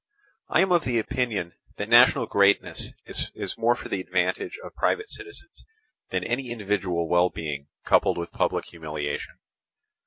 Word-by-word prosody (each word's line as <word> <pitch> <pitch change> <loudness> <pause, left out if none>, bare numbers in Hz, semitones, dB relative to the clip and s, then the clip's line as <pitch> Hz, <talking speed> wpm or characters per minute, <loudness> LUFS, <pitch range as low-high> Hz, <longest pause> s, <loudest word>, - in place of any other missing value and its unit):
I - - +4
am 190 -1 +2
of 175 -5 +3
opinion 115 -6 -1 0.2
that 105 - -3
national 120 +2 +6
greatness 100 -2 +2 0.2
is - - -4
more 120 +1 +4
for - - -8
the 95 - -2
advantage 90 0 -1
of - - -9
private 435 -1 0
citizens, 410 0 -6 0.5
than 95 -1 -1
any 120 +4 -2
individual 95 -6 -1
well 90 +2 +4
being 75 -4 -5 0.2
coupled - - +4
with 85 -1 -4
public - - 0
humiliation. 75 -3 -5
100 Hz, 145 wpm, -26 LUFS, 85-120 Hz, 0.5 s, national